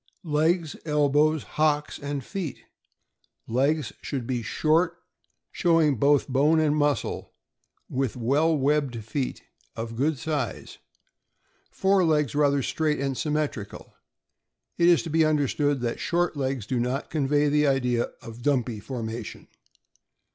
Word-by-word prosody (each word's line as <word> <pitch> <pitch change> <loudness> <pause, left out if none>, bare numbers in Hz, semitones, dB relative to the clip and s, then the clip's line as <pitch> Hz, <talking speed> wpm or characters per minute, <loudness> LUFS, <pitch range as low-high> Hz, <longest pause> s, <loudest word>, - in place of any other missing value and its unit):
Legs, 160 +1 +1
elbows, 150 0 +2
liocks, 150 -1 +1
and 140 -1 -4
feet.— 185 -9 -5 0.8
Legs 135 0 0
should 135 -5 -4
be 125 -1 -2
short, 160 - +1 0.5
showing 165 -5 +3
both 140 +4 +3
bone 145 +4 +3
and 150 -1 +2
muscle, 145 -1 -1 0.5
and 130 - -5
with 135 -4 0
well 145 +7 +2
webbed 140 -4 0
feet 130 +4 -3 0.3
of 115 0 -5
good 145 +5 0
size; 150 +1 -4 0.9
fore 195 0 +2
legs 150 -3 +2
rather 140 -2 +2
straight 155 +2 0
and 135 -1 -1
symmetrical. 150 -8 -3 0.8
It 170 - +3
is 175 -2 +5
to 165 - -6
be 160 +1 +4
understood 145 -2 +1
that 120 -1 -2
short 175 -1 0
legs 135 -5 -2
do 125 +2 -1
not 125 +3 -2
convey 145 -1 +2
the 150 0 +3
idea 125 -3 +1 0.2
of 115 0 -9
a - - -13
dumpy 125 -5 0
formation. 115 -1 -6
145 Hz, 135 wpm, -26 LUFS, 130-155 Hz, 0.9 s, is